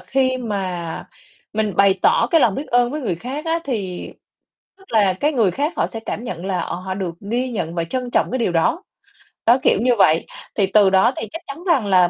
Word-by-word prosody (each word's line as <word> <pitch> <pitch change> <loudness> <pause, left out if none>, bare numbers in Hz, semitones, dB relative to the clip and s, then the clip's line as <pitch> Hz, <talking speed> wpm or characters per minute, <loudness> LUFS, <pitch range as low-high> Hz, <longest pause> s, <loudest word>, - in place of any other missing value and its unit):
khi 260 -1 +1
mà 185 -7 -4 0.5
mình 215 -3 -1
bày 195 -1 +4
tỏ 230 - +4
cái 330 - +5
lòng 220 -7 +3
biết 285 - -4
ơn 245 0 +3
với 300 +3 -4
người 225 -10 -1
khác 260 - -6
á 330 +1 +1
thì 200 -9 -4 0.7
tức 385 - -19
là 205 -4 +4
cái 295 +10 0
người 225 -9 +3
khác 290 - -1
họ - - +1
sẽ 225 - -7
cảm 225 +1 -5
nhận 180 -4 -5
là, 185 -3 -1
ờ, - - -3
họ 185 +1 -5
được 185 -3 -4 0.2
ghi 250 +2 0
nhận 175 -7 -3
và 170 -1 -1
trân 250 +6 -3
trọng - - +2
cái 260 - 0
điều 225 -7 0
đó. 170 - +1 0.6
Đó, 235 +2 +6
kiểu - - +4
như 245 0 +3
vậy, 160 -4 +4 0.3
thì 200 - +3
từ 200 0 +5
đó 190 +7 +4
thì 220 - -4
chắc 330 - -6
chắn 295 +5 -8
rằng 300 - +2
là 180 -2 +5
220 Hz, 235 wpm, -20 LUFS, 185-255 Hz, 0.7 s, Đó